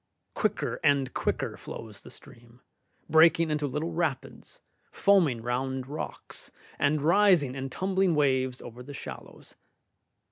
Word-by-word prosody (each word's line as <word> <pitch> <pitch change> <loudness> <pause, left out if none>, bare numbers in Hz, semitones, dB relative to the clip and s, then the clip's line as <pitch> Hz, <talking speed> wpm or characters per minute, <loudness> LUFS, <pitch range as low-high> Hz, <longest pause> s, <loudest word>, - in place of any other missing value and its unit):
Quicker - - -1
and 140 -2 +2
quicker - - -2
flows 110 -3 -9
the - - -13
stream, 120 +1 -15 0.5
breaking 160 0 +5
into 150 -1 0
little 150 +5 -3
rapids, 160 -6 -4 0.3
foaming 165 - +3
round 130 +2 -2
rocks, 145 +4 -6 0.3
and 145 0 +1
rising 170 -5 +4
in 135 0 -5
tumbling 190 +3 +1
waves 130 -3 +1
over 120 +1 -10
the 140 +3 -9
shallows. - - -10
140 Hz, 120 wpm, -28 LUFS, 130-165 Hz, 0.5 s, breaking